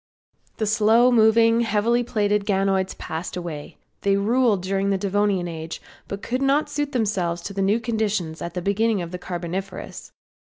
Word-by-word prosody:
The 220 Hz, -, 0 dB
slow 225 Hz, +3 st, +4 dB
moving, 230 Hz, 0 st, +5 dB
heavily 230 Hz, +2 st, +2 dB
plated 210 Hz, -3 st, 0 dB
ganoids 195 Hz, -1 st, +1 dB
passed 165 Hz, +3 st, -5 dB
away. 165 Hz, -5 st, -7 dB, 0.2 s
They 200 Hz, 0 st, +2 dB
ruled 220 Hz, -1 st, +2 dB
during 195 Hz, +1 st, 0 dB
the 195 Hz, -, +2 dB
Devonian 200 Hz, -2 st, 0 dB
age, 160 Hz, -1 st, -6 dB, 0.3 s
but 200 Hz, 0 st, -6 dB
could 255 Hz, +2 st, -2 dB
not 275 Hz, +2 st, +2 dB
suit 290 Hz, -1 st, -2 dB
themselves 200 Hz, -9 st, 0 dB
to 200 Hz, -, -6 dB
the 195 Hz, -, -2 dB
new 200 Hz, +4 st, +2 dB
conditions 215 Hz, -8 st, -2 dB
at 170 Hz, +1 st, -4 dB
beginning 205 Hz, 0 st, +1 dB
of 170 Hz, -, -7 dB
the 180 Hz, -, -5 dB
Carboniferous. 180 Hz, +2 st, -6 dB
200 Hz, 160 wpm, -23 LUFS, 185-225 Hz, 0.3 s, moving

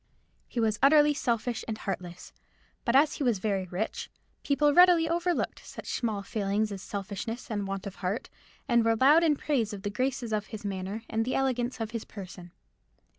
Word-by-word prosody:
He 240 Hz, -, -4 dB
was 220 Hz, -2 st, +1 dB
utterly 295 Hz, +1 st, +6 dB
selfish 240 Hz, -3 st, -1 dB
and 220 Hz, -2 st, -3 dB
heartless. 180 Hz, -4 st, -6 dB, 0.5 s
But 235 Hz, -, +2 dB
as 290 Hz, +2 st, +5 dB
he -, -, -2 dB
was 240 Hz, -5 st, +2 dB
very 195 Hz, -1 st, -1 dB
rich, 185 Hz, +5 st, -4 dB, 0.3 s
people 290 Hz, +1 st, +2 dB
readily 350 Hz, -1 st, +6 dB
overlooked 345 Hz, +1 st, -1 dB
such -, -, -8 dB
small 215 Hz, -5 st, -1 dB
failings 205 Hz, +1 st, -1 dB
as 195 Hz, -2 st, -6 dB
selfishness 205 Hz, +5 st, -5 dB
and 205 Hz, -2 st, -2 dB
want 195 Hz, 0 st, -4 dB
of 195 Hz, -1 st, -7 dB
heart, 190 Hz, +5 st, -2 dB, 0.4 s
and 235 Hz, -1 st, +4 dB
were 225 Hz, 0 st, +3 dB
loud 290 Hz, +8 st, +6 dB
in 310 Hz, -3 st, +4 dB
praise 255 Hz, -8 st, -1 dB
of 200 Hz, -1 st, -7 dB
the 205 Hz, -, -2 dB
graces 250 Hz, 0 st, -2 dB
of 210 Hz, -1 st, -1 dB
his 210 Hz, -1 st, -8 dB
manner 195 Hz, +2 st, -4 dB
and 225 Hz, 0 st, 0 dB
the 255 Hz, -, -2 dB
elegance 255 Hz, -2 st, 0 dB
of 220 Hz, -1 st, -3 dB
his 230 Hz, -2 st, -4 dB
person. 180 Hz, -3 st, -10 dB
225 Hz, 185 wpm, -29 LUFS, 200-265 Hz, 0.5 s, utterly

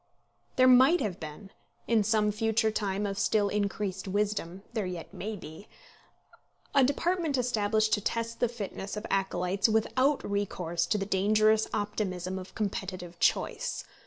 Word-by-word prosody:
There 255 Hz, 0 st, +5 dB
might 260 Hz, +7 st, +7 dB
have 195 Hz, -4 st, -2 dB
been, 160 Hz, +6 st, -9 dB, 0.3 s
in 225 Hz, -2 st, +3 dB
some 210 Hz, 0 st, +2 dB
future 220 Hz, +1 st, +1 dB
time 205 Hz, -1 st, -1 dB
of 200 Hz, -1 st, -3 dB
still 205 Hz, 0 st, +2 dB
increased 200 Hz, -2 st, -2 dB
wisdom, 195 Hz, -2 st, -2 dB
there 215 Hz, -5 st, -1 dB
yet 175 Hz, -2 st, -7 dB
may 215 Hz, +3 st, -4 dB
be, 160 Hz, +2 st, -10 dB, 1.1 s
a 275 Hz, -, +5 dB
department 320 Hz, +2 st, +1 dB
established 220 Hz, -3 st, +1 dB
to 205 Hz, -, +2 dB
test 230 Hz, +2 st, -2 dB
the 245 Hz, -, +2 dB
fitness 205 Hz, -3 st, -6 dB
of 210 Hz, -, -5 dB
acolytes 195 Hz, +1 st, +1 dB
without 255 Hz, +6 st, +1 dB
recourse 180 Hz, -4 st, -1 dB
to 210 Hz, -, +1 dB
the 195 Hz, -, -2 dB
dangerous 215 Hz, +3 st, +3 dB
optimism 190 Hz, -3 st, -2 dB
of 185 Hz, -, -11 dB
competitive 185 Hz, -4 st, -4 dB
choice. -, -, 0 dB
205 Hz, 145 wpm, -29 LUFS, 190-220 Hz, 1.1 s, might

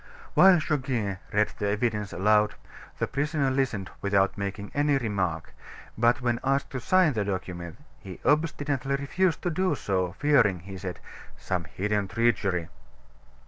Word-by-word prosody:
While 185 Hz, -1 st, +7 dB
Goguet 130 Hz, -11 st, -1 dB
read 105 Hz, +1 st, +1 dB
the 105 Hz, -, 0 dB
evidence 105 Hz, -1 st, -1 dB
aloud, 105 Hz, +3 st, +2 dB, 0.4 s
the -, -, 0 dB
prisoner 140 Hz, 0 st, 0 dB
listened 120 Hz, -8 st, -1 dB
without 100 Hz, -1 st, +2 dB
making 100 Hz, 0 st, -5 dB
any 145 Hz, -1 st, +2 dB
remark, 95 Hz, -9 st, -2 dB, 0.4 s
but 120 Hz, +2 st, +2 dB
when 120 Hz, -1 st, 0 dB
asked 135 Hz, +1 st, 0 dB
to 130 Hz, -, -3 dB
sign 180 Hz, +4 st, +3 dB
the 105 Hz, -3 st, 0 dB
document, 90 Hz, -3 st, -5 dB, 0.2 s
he 95 Hz, -4 st, -10 dB
obstinately 145 Hz, -3 st, +1 dB
refused 155 Hz, +5 st, 0 dB
to 175 Hz, -, 0 dB
do 185 Hz, +3 st, +1 dB
so, 95 Hz, -2 st, -1 dB
fearing, 120 Hz, -, +3 dB
he 95 Hz, +2 st, -9 dB
said, 90 Hz, -1 st, -6 dB, 0.4 s
"some 90 Hz, -3 st, -3 dB
hidden 100 Hz, +5 st, -1 dB
treachery." 100 Hz, -7 st, 0 dB
110 Hz, 140 wpm, -27 LUFS, 95-140 Hz, 0.4 s, While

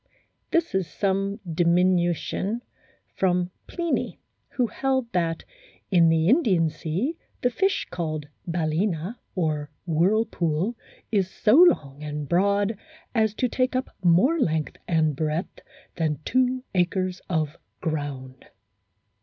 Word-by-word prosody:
This 335 Hz, -1 st, +1 dB
is 190 Hz, -3 st, 0 dB
some 195 Hz, +1 st, -1 dB
diminution 175 Hz, +5 st, +1 dB, 0.5 s
from 180 Hz, -1 st, +1 dB, 0.2 s
Pliny, 340 Hz, -2 st, -2 dB, 0.3 s
who 250 Hz, -, +2 dB
held 260 Hz, 0 st, -1 dB
that 165 Hz, -3 st, 0 dB, 0.5 s
"in 170 Hz, -3 st, +6 dB
the 160 Hz, 0 st, +3 dB
Indian 195 Hz, -, +4 dB
sea 195 Hz, -, -2 dB, 0.2 s
the 245 Hz, -, +2 dB
fish 385 Hz, +9 st, +1 dB
called 155 Hz, -4 st, -3 dB, 0.2 s
balcena, 170 Hz, +4 st, -1 dB, 0.2 s
or 155 Hz, -5 st, -1 dB, 0.2 s
whirlpool, 175 Hz, +2 st, +1 dB, 0.4 s
is 195 Hz, -4 st, +2 dB
so 210 Hz, -, +2 dB
long 155 Hz, -, +5 dB
and 150 Hz, -1 st, -4 dB
broad 200 Hz, +4 st, +2 dB, 0.3 s
as 220 Hz, -3 st, +2 dB
to 250 Hz, -, +1 dB
take 255 Hz, +2 st, 0 dB
up 255 Hz, +1 st, -1 dB
more 185 Hz, -, +4 dB
length 160 Hz, -, 0 dB
and 160 Hz, -3 st, +2 dB
breadth 155 Hz, +3 st, -2 dB, 0.4 s
than 155 Hz, -3 st, 0 dB
two 255 Hz, 0 st, +1 dB
acres 185 Hz, 0 st, 0 dB
of 160 Hz, -2 st, -1 dB, 0.2 s
ground." 140 Hz, -5 st, -4 dB
180 Hz, 115 wpm, -25 LUFS, 160-225 Hz, 0.5 s, in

